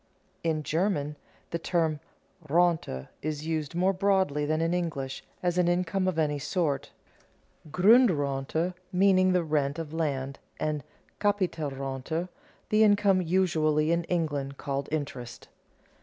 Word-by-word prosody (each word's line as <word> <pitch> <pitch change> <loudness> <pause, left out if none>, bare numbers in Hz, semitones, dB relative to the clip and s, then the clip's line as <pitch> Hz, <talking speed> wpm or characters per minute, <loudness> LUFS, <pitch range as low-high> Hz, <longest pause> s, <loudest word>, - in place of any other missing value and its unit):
In 160 -2 0
German 155 -3 0 0.4
the 170 - -1
term 165 -3 0 0.5
Rente 160 - +1
is 155 0 -3
used 160 -1 -2
more 185 +2 +2
broadly 190 -7 +1
than 155 +1 +1
in 165 +1 +1
English, 150 -7 -3 0.2
as 175 0 +1
an 175 - +3
income 180 +2 +1
of 185 -3 0
any 150 -2 +1
sort, 150 -2 -1 0.8
Grundrente 165 - +3 0.2
meaning 185 0 +4
the 180 -1 +2
rent 145 -2 0
of 160 -2 -5
land, 140 -4 -2 0.2
and 150 -2 -1 0.4
Capitalrente 160 -5 -1 0.4
the 215 +1 +5
income 205 -3 +4
usually 160 -3 +2
in 170 0 +1
England 145 -6 -2
called 140 0 -3
interest. 135 -6 -5
160 Hz, 125 wpm, -28 LUFS, 145-180 Hz, 0.8 s, the